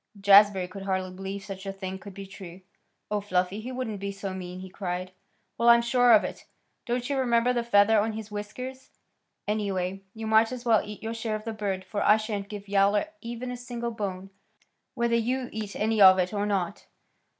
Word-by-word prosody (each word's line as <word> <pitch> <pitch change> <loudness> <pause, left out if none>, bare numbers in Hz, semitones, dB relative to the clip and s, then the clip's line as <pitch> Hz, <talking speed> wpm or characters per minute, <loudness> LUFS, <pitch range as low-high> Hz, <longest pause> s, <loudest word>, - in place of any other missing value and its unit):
Jazbury 200 -1 +6
could 195 +2 -9
hardly 190 -1 -2
believe 195 +1 -6
such 195 -1 -7
a - - -1
thing 190 -1 -6
could 195 -1 -11
be 195 - -7
true. 190 -2 -11 0.5
"Oh, 210 -1 0
Fluffy! 185 +1 -1
He 250 +4 -6
wouldn't 250 -5 -4
be 200 +1 -3
so 195 -1 -5
mean!" 180 -1 -7
he 190 - -8
cried. 185 -1 -4 0.5
"Well, 235 0 +5
I'm 235 0 +7
sure 245 0 +4
of 215 - +7
it. - - -6 0.4
Don't 245 0 -1
you 280 -2 -1
remember 240 -1 +2
the 240 -1 0
feather 215 -1 +5
on 220 +2 0
his 215 -1 -7
whiskers? 255 +6 -7 0.6
Anyway, 195 -3 -1
you 220 0 -6
might 220 +1 +4
as 250 -1 -6
well 225 -3 +4
eat 210 0 -9
your 225 +1 -3
share 225 -1 -3
of 215 +1 -7
the 225 - -3
bird 195 -3 -3
for 205 +2 -3
I 210 - +6
shan't 210 -2 -4
give 205 -1 -8
Yowler 200 +7 +2
even 240 +1 -5
a - - -4
single 240 -1 -5
bone, 195 -3 -5 0.6
whether 235 -1 +1
you 245 +2 -1
eat 215 -2 -5
any 220 0 +1
of 190 -1 +9
it 185 +2 0
or 205 0 -1
not." 195 -2 -2
210 Hz, 205 wpm, -27 LUFS, 195-230 Hz, 0.6 s, of